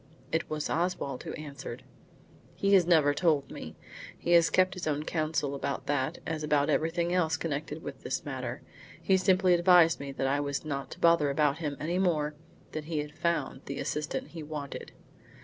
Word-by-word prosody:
It 160 - -1
was 155 -1 -2
Oswald 165 -6 -1
who - - -5
answered. 140 -5 -7 0.7
"He 200 0 +2
has 185 -3 +6
never 155 -5 +5
told 150 -3 +1
me. 80 - -8 0.4
He 175 - -2
has 170 -1 +6
kept 185 0 +3
his 180 -3 -5
own 150 0 0
counsel 155 -3 -1
about 140 0 -3
that 140 -2 0
as 160 -1 -3
about 150 0 +2
everything 170 +3 +1
else 165 -3 +2
connected 155 0 -4
with - - -7
this - - -3
matter. - - -5 0.4
He 190 - +3
simply 185 -1 +4
advised 175 -2 +6
me 140 0 -5
that 135 - -2
I 140 +2 +2
was 140 +1 -2
not 140 -2 -3
to - - -10
bother 170 -4 +4
about 145 +1 +2
him 145 -4 -3
any 170 +4 -1
more; 155 -5 +1 0.4
that 155 -1 -5
he 160 0 -3
had 150 0 -3
found 170 -4 -1
the 140 - -5
assistant 150 - -3
he 165 - -8
wanted." 150 -2 -6
155 Hz, 185 wpm, -29 LUFS, 145-170 Hz, 0.7 s, has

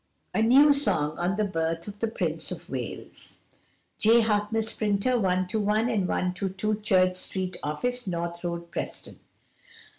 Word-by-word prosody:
A - - +1
NEW 275 +6 +7
SONG 155 - +1
ON 180 +3 0
THE 215 - +2
BIRTH 165 -3 -2
OF 205 0 -8
THE 230 - 0
PRINCE 225 - -2
OF - - -11
WALES - - -6 0.6
J. 230 +2 +5
Harkness, 220 0 0
Printer, 210 +4 +1
121 200 +2 +1
and 200 -5 0
122 195 +4 -1
Church 185 -3 +3
Street 185 -1 -2
Office, 245 +11 -2
North 170 -1 -3
Road, 170 -1 -4
Preston. - - -6
200 Hz, 140 wpm, -27 LUFS, 180-220 Hz, 0.6 s, NEW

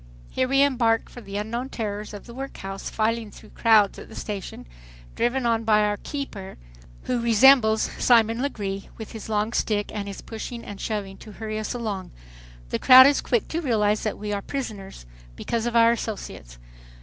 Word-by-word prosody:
Here 255 - 0
we 275 +1 +4
embark 235 -5 +1
for 245 - -11
the 200 -2 -6
unknown 235 +5 -3
terrors 210 -3 -4
of 205 -1 -9
the 235 - -11
workhouse, 195 -7 -6
filing 225 0 -1
through 215 +1 -15
crowds 215 -4 +3
at - - -11
the 220 - -12
station, 200 -3 -6 0.5
driven 240 +2 0
on 230 -1 +1
by 215 -1 +4
our 210 0 0
"keeper," 215 -10 -7 0.5
who 250 - -1
resembles 230 -1 +5 0.2
Simon 230 -1 +4
Legree, 200 -8 -4
with 220 - -8
his 220 -1 -8
long 215 +1 0
stick 205 -3 -1
and 205 -1 -4
his 200 - -7
pushing 230 +1 -7
and 200 -1 -8
shoving 200 -3 -4
to 215 - -12
hurry 215 +1 -5
us 215 +3 -4
along. 210 -6 -4 0.6
The - - -2
crowd 260 0 +9
is 280 +1 +3
quick 240 -3 0
to 330 - -2
realize 215 -7 +1
that 215 - -3
we 210 0 -4
are 200 - -2
prisoners, 205 - -6 0.3
because 230 - -2
of 240 - -3
our 230 0 +6
associates. 200 - -6
220 Hz, 185 wpm, -24 LUFS, 205-240 Hz, 0.6 s, crowd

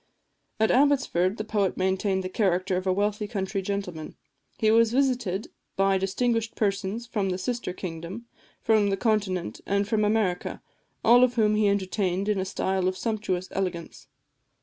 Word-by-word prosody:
At 220 - +3
Abbotsford 255 -9 +2
the 215 - -3
poet 205 -3 0
maintained 190 +1 0
the - - -2
character 185 -1 0
of 185 +1 -2
a - - +3
wealthy 205 +2 0
country 195 -2 -2
gentleman. 185 -5 -4 0.4
He 215 -1 +3
was 225 0 +4
visited 245 -7 0 0.3
by 195 0 +2
distinguished 225 +4 -1
persons 200 +2 -1
from 210 -5 -1
the 180 - -1
sister 235 +1 -3
kingdom, 180 +5 -7 0.4
from 215 -3 +3
the 195 - 0
Continent, 195 - -1
and 200 0 +1
from 215 0 +1
America, 210 -4 0 0.4
all 245 +2 +7
of 250 -1 +2
whom 215 -2 +3
he 210 -1 +3
entertained 195 -1 -1
in 210 -2 +1
a 190 - -1
style 190 -1 -1
of 185 0 -1
sumptuous 205 -5 -2
elegance. 180 -3 -4
200 Hz, 160 wpm, -26 LUFS, 185-220 Hz, 0.4 s, all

